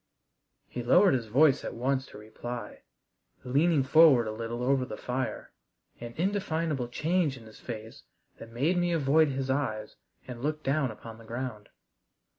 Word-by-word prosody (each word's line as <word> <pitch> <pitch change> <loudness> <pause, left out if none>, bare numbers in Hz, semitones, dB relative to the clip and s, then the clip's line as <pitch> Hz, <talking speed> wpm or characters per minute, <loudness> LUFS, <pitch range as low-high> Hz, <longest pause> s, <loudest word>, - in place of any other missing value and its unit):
He 125 - -5
lowered 180 +11 +5
his 120 -4 -1
voice 140 +5 +4
at - - -5
once 130 +2 -1
to - - -12
reply, 110 +1 -8 0.6
leaning 145 +3 +2
forward 140 -3 +6
a - - -2
little 115 +2 -4
over 135 0 +2
the 125 - -7
fire, 130 +1 -4 0.5
an 120 0 -8
indefinable 165 -7 -1
change 155 +2 0
in 120 - -13
his 110 - -14
face 110 -2 -8 0.4
that 115 - -10
made 140 +10 0
me 175 0 +1
avoid 155 0 +4
his 135 -1 -2
eyes 110 -6 -2 0.3
and 120 -2 -8
look 155 +2 -2
down 135 -1 +1
upon 110 +1 -10
the - - -13
ground. 115 -2 -6
130 Hz, 160 wpm, -29 LUFS, 115-155 Hz, 0.6 s, forward